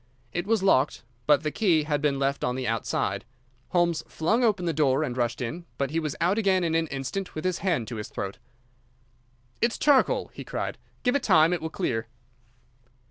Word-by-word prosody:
It 175 +2 -2
was 220 -3 +2
locked, 145 -7 +3 0.2
but 150 0 +5
the 155 - -1
key 170 -7 +2
had 150 -1 -1
been 145 -2 +1
left 140 +1 0
on 125 - 0
the 130 -1 -3
outside. 115 0 -1 0.4
Holmes 170 -2 +1
flung 220 +10 +1
open 205 -6 +2
the 165 - 0
door 140 -1 +2
and 125 -5 -3
rushed 120 -1 -1
in, 160 +9 -4
but 140 -1 -1
he 165 - +1
was 155 -3 -3
out 185 +6 +2
again 190 -4 +2
in 165 -1 0
an 165 0 +1
instant, 140 +8 -4
with 155 - -4
his 185 -1 0
hand 165 - 0
to 120 - -5
his 105 - -6
throat. 100 +4 -5 1.2
"It's 235 0 +2
charcoal," 300 - +3
he - - -7
cried. - - -4 0.2
"Give 245 0 +2
it 285 - +2
time. 165 -5 +5
It 175 - -2
will 160 - -3
clear." 120 - -2
160 Hz, 200 wpm, -26 LUFS, 135-185 Hz, 1.2 s, but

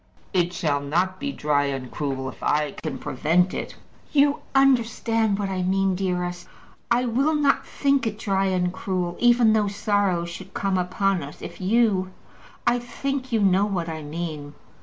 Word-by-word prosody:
"It 175 -2 +2
shall 155 -5 0
not 175 +7 -1
be 280 +1 -2
dry 145 - +1
and 135 -2 -4
cruel, 135 -3 -3
if 130 - -9
I 150 -1 +1
can 150 -3 -5
prevent 165 +7 +1
it." - - -5 0.4
"You 285 0 +3 0.2
understand 230 -5 +3
what 200 -1 -2
I 190 -1 -2
mean, 190 +1 +1
dearest. 180 -1 -2 0.4
I 240 +1 +2
will 270 +7 +1
not 285 -2 +2
think 275 -4 +1
it 215 -1 -3
dry 195 -3 0
and 180 -1 0
cruel, 180 -2 -2
even 240 -2 +5
though 215 -2 +2
sorrow 200 -4 0
should 185 +3 -9
come 195 -2 0
upon 185 +1 0
us, 140 +1 -9
if 170 - -8
you 195 -2 +2 0.6
I 245 +1 +3
think 260 +2 -4
you 225 -2 +2
know 195 0 +4
what 175 -5 -2
I 160 -1 -5
mean." 150 -1 -6
190 Hz, 170 wpm, -24 LUFS, 170-225 Hz, 0.6 s, even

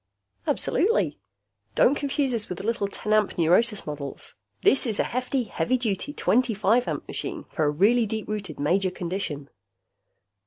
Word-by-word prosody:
"Absolutely. 450 +8 +1 0.6
Don't 270 - +5
confuse 285 -1 0
this 225 -3 -2
with 180 - -4
the - - -7
little 225 -3 0
ten 210 +1 -2
amp 215 -2 +2
neurosis 195 +6 +3
models. 145 -2 -6 0.3
This 265 -1 +4
is 215 -3 0
a - - +4
hefty, 255 +1 -1
heavy 255 +2 0
duty, 235 +2 -2
twenty 245 -4 +1
five 220 +5 +2
amp - - -3
machine 355 -5 -4
for 160 -5 0
a - - +3
really 215 +10 +3
deep 220 +1 -4
rooted 205 -7 -5
major 185 +6 +2
condition." 175 -6 -4
215 Hz, 160 wpm, -25 LUFS, 180-250 Hz, 0.6 s, Don't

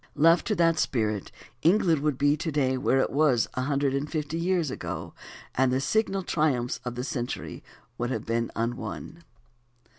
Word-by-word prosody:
Left 165 +3 +4
to 215 - +1
that 165 -2 +3
spirit 110 -5 -1 0.3
England 170 -3 +3
would 150 -3 0
be 145 +1 +3
to 160 +2 -3
day 135 -3 +1
where 130 +1 +2
it - - -1
was 140 -5 +3
a 130 - -2
hundred 140 0 0
and 140 +2 -2
fifty 155 0 -2
years 170 -4 +1
ago, - - -5 0.4
and 130 0 +2
the 130 - +2
signal 195 +5 0
triumphs 140 -8 0
of 125 -1 -4
the 125 - -3
century 125 -2 -4 0.4
would 120 0 -1
have 115 -4 -3
been 115 0 0
unwon. 120 +7 -4
140 Hz, 175 wpm, -27 LUFS, 125-165 Hz, 0.4 s, Left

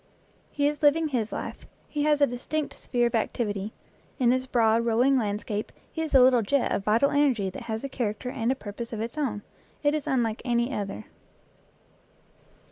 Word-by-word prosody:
He 285 -1 +1
is 295 0 -2
living 310 +2 +4
his 230 -5 -1
life, - - -6 0.2
he 295 - -3
has 300 -1 +3
a - - +8
distinct 280 +4 -3
sphere 240 -1 -1
of 235 - 0
activity; 210 -2 -1 0.5
in 245 -3 +3
this 255 +1 0
broad, 230 -2 +3
rolling 240 +4 +3
landscape 210 -2 -2 0.2
he 320 - -4
is 315 -3 -2
a 260 - +9
little 250 -2 +5
jet 255 +6 +1
of 195 - 0
vital 225 +7 +3
energy 255 -10 +2
that - - -8
has 220 +2 -3
a - - -2
character 250 -2 -3
and 235 0 0
a - - +1
purpose 230 0 -7
of 220 - -4
its 230 +4 -4
own; 235 -9 -2 0.4
it 290 0 +3
is 305 -2 -2
unlike 235 -4 0
any 240 +1 0
other. 205 0 -4
240 Hz, 190 wpm, -27 LUFS, 220-280 Hz, 0.5 s, a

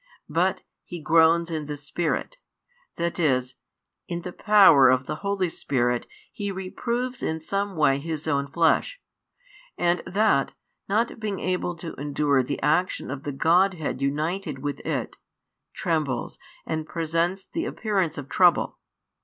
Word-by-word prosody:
But - - +1 0.2
He 175 - -7
groans 165 +2 +4
in 155 -2 -3
the 150 -1 -4
spirit, 170 - -2 0.6
that 170 +1 -2
is, 130 -5 +1 0.5
in 170 -1 -4
the 180 - -6
power 190 - +6
of 130 +1 +2
the 150 +2 -4
Holy 200 0 -1
Spirit 120 -5 0 0.2
He 200 -1 -4
reproves 235 +7 -3
in 160 0 -2
some 195 +4 -2
way 140 -3 +3
His 160 +1 -4
Own 140 -2 0
Flesh: 170 - +1 0.8
and 175 0 +1
That, 200 -9 +2 0.4
not 225 +3 0
being 210 -3 -3
able 180 -1 -1
to 165 0 -7
endure 145 -1 +2
the 135 +3 -3
action 155 +1 +1
of 140 -1 -5
the 145 - -2
Godhead 165 0 +2
united 150 +3 -1
with 145 +2 -4
It, - - -3 0.5
trembles 155 -7 -2 0.3
and 155 -1 -3
presents 170 +4 -1
the 335 +1 -4
appearance 190 -8 -1
of 145 -2 -6
trouble. 175 +2 +3
165 Hz, 140 wpm, -25 LUFS, 145-190 Hz, 0.8 s, power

